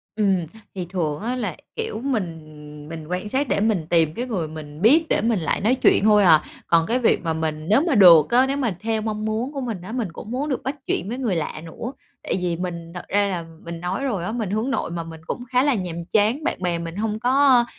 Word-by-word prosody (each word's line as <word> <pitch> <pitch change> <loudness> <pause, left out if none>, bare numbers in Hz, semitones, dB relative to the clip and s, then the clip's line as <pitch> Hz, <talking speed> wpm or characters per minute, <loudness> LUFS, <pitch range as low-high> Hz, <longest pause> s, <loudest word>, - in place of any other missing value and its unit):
Ừm, 200 -3 +2 0.4
thì 185 -2 -3
thường 165 -5 -2
á 240 +4 -2
là, 255 - -3 0.2
kiểu, 450 - -3
mình 185 - -2 0.4
mình 160 -2 -7
quan 180 +4 -3
sát 270 +5 0
để - - +1
mình 200 -7 +1
tìm 165 -3 +3
cái 240 +8 -3
người 195 -10 -2
mình 155 0 -9
biết 295 - +5
để - - +2
mình 225 -2 +1
lại 155 -4 -1
nói 225 +6 +3
chuyện 255 - +4
thôi 210 -1 +5
à. 160 -4 +6 0.3
Còn 165 -1 +4
cái 245 +2 +1
việc 235 - +2
mà 165 -1 0
mình 155 -1 -3
nếu 220 +6 +5
mà 320 - +2
được 170 -7 +8
á, 250 +2 +5
nếu 275 +1 -1
mà 235 -9 -1
theo 220 0 -1
mong 215 0 -3
muốn 225 +6 -2
của 275 - -4
mình 225 -8 -4
á 185 - -8
mình 230 -7 -2
cũng 210 +6 -9
muốn 275 +5 -2
được 265 - -2
bắt 270 +2 -2
chuyện 190 - -1
với 240 - -3
người 235 -8 -1
lạ 155 -1 -3
nữa, 230 +10 -6 0.3
tại - - -1
vì 175 -2 0
mình 170 -1 -5
thật 180 - -6
ra 205 0 +2
là 175 -4 -3 0.2
mình 170 0 -6
nói 180 +8 -2
rồi 210 -10 -1
á 180 - -2
mình 225 -4 -3
hướng 220 +6 -1
nội 260 - -2
mà, 170 -1 -3
mình 165 -1 -10
cũng 245 - -4
khá 250 0 +4
là 285 -1 +3
nhàm 180 -7 -3 0.2
chán, 220 +8 +2
bạn 330 - -2
bè 175 -2 0
mình 165 0 -6
hông 215 +1 -2
có, 255 0 +4
205 Hz, 255 wpm, -23 LUFS, 170-245 Hz, 0.4 s, được